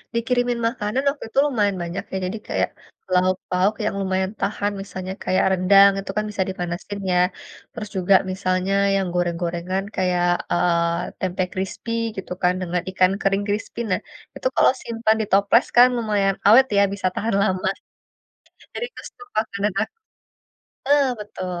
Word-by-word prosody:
Dikirimin 245 +1 +1
makanan 230 +2 -2
waktu 285 +1 -5
itu 265 - -12
lumayan 210 -9 +1
banyak 170 +2 -4
ya, 190 - -2
jadi 190 +5 -3
kayak, - - 0 0.4
lauk 185 0 +3
pauk 185 +4 +2
yang 210 - -1
lumayan 190 +1 -1
tahan, 205 +1 -1
misalnya 190 -1 -6
kayak 185 - +2
rendang 195 +2 +6
itu 195 0 -5
kan 215 - +1
bisa 195 -2 0
dipanasin 180 +2 -5
ya, 180 - +3 0.5
terus 215 -3 -7
juga 190 +1 +4 0.2
misalnya 185 0 -1 0.2
yang 195 -1 0
goreng-gorengan 175 +1 -1
kayak, 180 -2 +1 0.3
eee, 170 0 +1
tempe 185 0 -1
krispi 190 +4 -4 0.3
gitu 190 - -7
kan 180 - +4
dengan 180 0 -1
ikan 185 0 +3
kering 195 +1 +1
krispi. 210 +3 -3
Nah, - - +2 0.4
itu - - -1
kalau - - +5
simpan 230 -2 +1
di - - -1
toples 200 +4 +4
kan 245 +1 +9
lumayan 205 -4 +1
awet 230 +6 +8
ya, 200 - +6
bisa 190 -2 -1
tahan 225 +1 -1
lama. 185 -2 +1 1.0
Jadi 480 - -3
itu - - -12
stok 410 - -15
makanan 205 -2 -3
aku 220 - -4 1.0
eh, 285 -1 +5 0.2
betul. 185 -4 -5
195 Hz, 160 wpm, -22 LUFS, 185-215 Hz, 1.0 s, kan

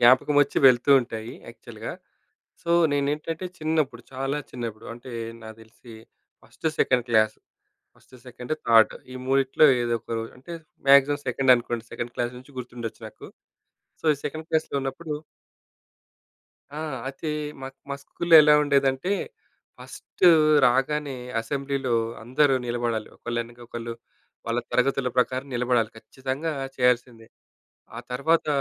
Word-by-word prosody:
జ్ఞాపకమొచ్చి 140 +4 +4
వెళ్తూ 125 +2 +2
ఉంటాయి 115 -1 -6 0.2
యాక్చువల్‌గా. - - -8 0.7
సో, 170 - -4 0.2
నేనేంటంటే 150 +5 -2
చిన్నప్పుడు, 155 -6 -1
చాలా 135 +2 -2
చిన్నప్పుడు 115 -3 -6
అంటే, 120 +1 -11 0.3
నా 110 - -8
దెలిసి 110 +1 -15 0.5
first 160 - -4
second 125 -1 +2
class, 110 -1 +3 0.6
first, 130 - -19
second, 125 +4 -5
థాడ్. 115 -1 +6 0.2
ఈ - - -9
మూడిట్లో 135 +2 +3 0.2
ఏదొకో 115 -1 -2 0.2
అంటే, 150 +7 -11 0.4
మాక్సిమం 140 +1 +6
సెకండ్ 130 +1 +4
అనుకోండి. 120 -1 -4
సెకండ్ 120 0 -5
క్లాస్ 120 +1 -2
నుంచి 130 +1 -17
గుర్తుండచ్చు 120 -2 -7
నాకు. - - -13 0.7
సో, - - -26
ఈ - - -10
సెకండ్ 155 +2 -6
క్లాస్‌లో 155 -3 0
ఉన్నప్పుడు 150 +4 -5 1.6
ఆ! - - -4 0.3
ఐతే 145 +3 -5 0.3
మాక్ 135 0 -8
మా 140 - -1
స్కూల్‌లో 170 -1 +4
ఎలా 150 0 +6
ఉండేదంటే, 140 +4 +1 0.7
ఫస్టు 180 - 0 0.4
రాగానే 135 +3 +1 0.3
అసెంబ్లీలో 135 +1 -2 0.3
అందరూ 135 +4 +2
నిలబడాలి. 120 -2 -2
ఒకళ్ళెనక 120 0 -5
ఒకళ్ళు, 115 0 -6 0.5
వాళ్ళ 115 +1 0
తరగతుల 130 0 +1
ప్రకారం 130 +2 +1
నిలబడాలి. 120 -2 +1
ఖచ్చితంగా 130 +7 -4 0.2
చేయాల్సిందే. 125 -2 0 0.7
ఆ - - -5
తర్వాత, 155 +7 +1
130 Hz, 120 wpm, -25 LUFS, 120-145 Hz, 1.6 s, థాడ్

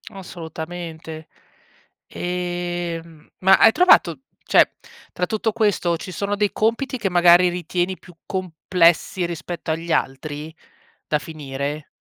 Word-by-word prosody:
Assolutamente. 160 -2 -8 0.8
Ehm, 175 -2 -4
ma 190 +1 +6
hai 225 - +7
trovato, 170 - +4 0.2
cioè, - - +4 0.4
tra 180 - -1
tutto 220 +3 -1
questo 200 -6 +1
ci 185 - -8
sono 200 +4 -2
dei 205 -1 +1
compiti 235 +4 0
che 200 -5 -1
magari 175 0 +6
ritieni 180 +1 -2
più 180 - -16
complessi 180 -1 +1
rispetto 170 0 -5
agli 165 +1 -3
altri, 150 +3 -2 0.5
da 150 - +1
finire? 145 -1 -5
175 Hz, 115 wpm, -22 LUFS, 160-185 Hz, 0.8 s, hai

